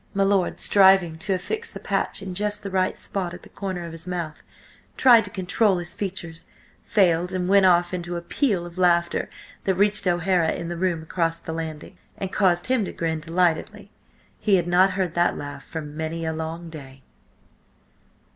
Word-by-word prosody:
My 195 - +3
lord, 195 -2 +1
striving 190 -4 +5
to 190 +3 -1
affix 440 - -3
the - - -6
patch - - -2
in 190 -2 -5
just 210 +2 -2
the 195 - -5
right 185 -1 0
spot 180 -3 -3
at - - -13
the - - -14
corner 185 -3 -5
of 170 - -7
his 165 +1 -4
mouth, 170 -4 -4 0.6
tried 240 -3 +7
to - - -5
control 195 +1 +1
his 175 0 -4
features, 175 -4 -5 0.3
failed, 180 -3 +2
and 180 -1 -1
went 195 0 +5
off 175 0 +3
into 175 -1 -4
a 170 - -3
peal 195 -4 0
of 175 +1 -10
laughter 170 -1 +2 0.4
that 190 - +1
reached 205 0 +3
O'Hara 175 -1 +2
in 170 - -5
the 175 - -4
room 170 -2 -1
across 165 0 -1
the 160 - -6
landing, 160 -2 -7 0.2
and 190 -1 -5
caused 180 -4 +2
him 255 -3 +1
to - - -5
grin 160 -1 -2
delightedly. 165 +1 -1 0.5
He 205 -3 +3
had 175 -2 +1
not 185 +2 +4
heard 185 -3 -1
that 175 +1 +1
laugh 145 0 -7
for 160 - -6
many 160 +2 -5
a 160 - -1
long 160 +1 -6
day. 135 -4 -11
175 Hz, 190 wpm, -24 LUFS, 165-195 Hz, 0.6 s, tried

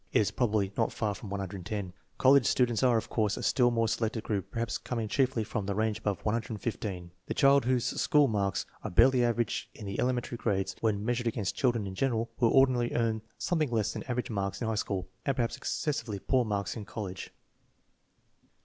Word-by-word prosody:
It - - +3
is 105 - +1
probably 105 -5 0
not 115 - +1
far 105 -3 -1
from 100 +1 -9
110. 100 0 -4 0.2
College 135 -3 +5
students 120 -1 +2
are, 125 -3 +4
of 110 - -2
course, 105 -3 0
a - - -5
still 125 -2 +4
more 115 -1 +1
selected 110 0 -1
group, 100 -5 -2
perhaps 115 -1 -2
coming 115 -3 -3
chiefly 130 -1 +1
from 105 -1 -3
the 100 - -1
range 110 0 0
above 105 -4 -2
115. 105 -5 -3 0.2
The - - -2
child 140 -1 +5
whose 125 -1 +1 0.2
school 150 -1 +4
marks 100 -4 0 0.2
are - - -3
barely 130 +7 +5
average 120 -2 0
in 105 - -9
the 100 0 -4
ele 125 - +3
mentary 120 -1 -4
grades, 95 -4 -1
when 105 -2 0
measured 120 0 0
against 110 -4 -1
children 120 -7 +1
in 95 - -5
general, 115 0 0
will 115 - +4
ordinarily 125 -2 +3
earn 115 -2 +1 0.2
something 160 -5 0
less 110 -3 0
than - - -5
average 125 -1 -2
marks 100 -2 -2
in 115 - -2
high 110 - 0
school, 100 -3 -2 0.2
and 140 - 0
perhaps 120 -2 0
excessively 120 -9 -2
poor 125 +6 +1
marks 100 -2 -2
in 110 - -5
college. 100 -3 -6
110 Hz, 200 wpm, -30 LUFS, 100-120 Hz, 0.2 s, College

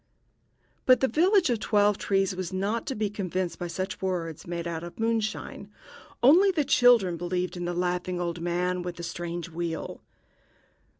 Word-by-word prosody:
But 255 -1 +7
the 265 - +2
village 350 - +3
of 235 - 0
Twelve 205 -1 +3
trees 195 -1 +1
was 185 -1 -4
not 200 +5 -2
to 265 - -2
be 210 0 0
convinced 185 -3 -3
by 175 - -3
such 185 +2 -4
words 175 -5 -3
made 170 0 -4
out 165 -1 -4
of 175 +4 -9
moonshine. 225 -1 -2 0.5
Only 345 +10 +7
the 320 -6 +1
children 240 -10 +4
believed 180 +1 -2
in 175 -1 -4
the 175 0 -2
laughing 180 0 -1
old 170 -1 -3
man 180 +1 -1
with 175 0 -5
the 170 - -8
strange 170 0 -5
wheel. 165 0 -4
185 Hz, 170 wpm, -27 LUFS, 175-220 Hz, 0.5 s, But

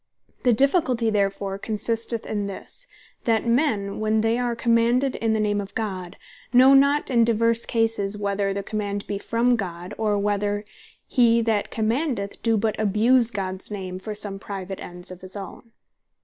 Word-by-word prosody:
The 245 - +3
difficulty 255 - +3
therefore 195 -1 -1
consisteth 225 +2 -1
in 205 -2 -2
this, 350 - -7 0.4
that 225 -1 +2
men 230 -6 +1
when 215 0 +1
they 225 +2 +1
are 240 -1 -1
commanded 235 +3 +2
in 225 -1 0
the 220 - +1
name 205 -1 +1
of 200 - -10
God, 190 -4 -4 0.3
know 260 +2 +7
not 280 +1 +4
in 235 -2 +4
divers 230 0 +2
Cases, 225 -3 0
whether 200 -1 -1
the 200 0 -3
command 205 -1 -3
be 200 -1 -3
from 235 +4 +1
God, 180 -2 -5
or 210 -2 +1
whether 205 0 -1 0.4
he 235 -2 +3
that 220 -2 0
commandeth, 225 -2 -2
doe 225 -1 +2
but 215 +1 -1
abuse 225 +4 +3
Gods 190 -3 -4
name 185 -3 -5
for 210 +2 -6
some 205 -1 -4
private 195 -1 -6
ends 175 +1 -7
of 185 - -10
his 185 +1 -7
own. 205 +3 -9
215 Hz, 165 wpm, -24 LUFS, 200-230 Hz, 0.4 s, know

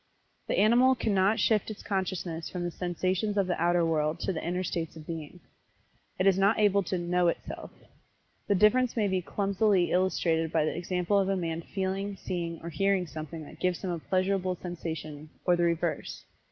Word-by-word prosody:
The - - 0
animal 245 +5 +5
cannot 205 -2 +2
shift 220 -1 +2
its 215 - -8
consciousness 185 -4 -3
from 180 -1 -4
the 175 - -2
sensations 185 +4 -1
of 200 - +3
the 180 -2 -2
outer 175 0 +3
world 155 -1 0
to 190 - -1
the 160 - -4
inner 180 +2 -1
states 165 -2 -3
of 155 -1 -10
being. 165 +1 -7 0.8
It 185 - +1
is 195 -1 +4
not 200 +3 +4
able 205 -2 +4
to 185 0 -2
"know 175 0 +1
itself." 170 - -3 0.8
The 200 - +3
difference 235 +6 +3
may 210 -2 +2
be 190 -1 0
clumsily 195 0 +1
illustrated 165 -3 +1
by 160 -2 +2
the - - -1
example 180 +3 0
of 195 -1 +1
a 195 - +1
man 165 -2 -2
feeling, 195 +2 -3
seeing 170 -3 -4
or 170 - -4
hearing 195 +1 +1
something 155 0 -7
that - - -13
gives 180 0 -1
him 185 - -1
a 170 - -3
pleasurable 185 +1 0
sensation, 160 -4 -6 0.2
or 180 - +4
the 175 0 +2
reverse. 170 -1 -2
180 Hz, 190 wpm, -29 LUFS, 170-195 Hz, 0.8 s, animal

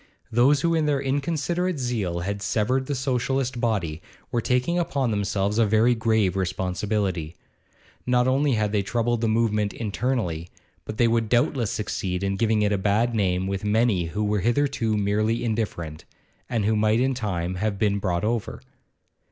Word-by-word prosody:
Those 130 +5 +4
who 170 +1 +2
in 160 -2 +1
their 145 -2 +2
inconsiderate 155 +6 -1
zeal 110 -10 -2
had 100 +2 -3
severed 125 +6 0
the 145 - -1
Socialist 130 -1 -1
body, 90 -9 -1 0.3
were 120 - 0
taking 125 +9 +1
upon 140 -7 0
themselves 100 +1 0
a 115 - +5
very 110 +3 +4
grave 110 -5 +1
responsibility; 95 -2 -2 0.7
not 125 0 +3
only 135 +2 +2
had 105 -2 0
they 105 -1 +1
troubled 115 +3 -1
the 115 - +1
movement 110 -2 +1
internally, 105 -7 -2 0.4
but 110 - -6
they 120 - +4
would 115 -1 +1
doubtless 120 -1 +2
succeed 95 -3 -3
in 100 0 0
giving 110 +1 +2
it 105 - +2
a 100 - 0
bad 105 +5 +1
name 95 -4 +1
with 95 0 -3
many 105 -3 +2
who 105 +6 -3
were 105 0 +1
hitherto 120 0 +1
merely 105 +3 0
indifferent, 100 -9 -3 0.5
and 115 -4 0
who 110 +1 +2
might 110 +1 +2
in 130 +1 +2
time 95 -7 -2
have 100 +2 -2
been 100 0 +1
brought 90 -2 -1
over. 115 0 -2
110 Hz, 170 wpm, -24 LUFS, 100-125 Hz, 0.7 s, a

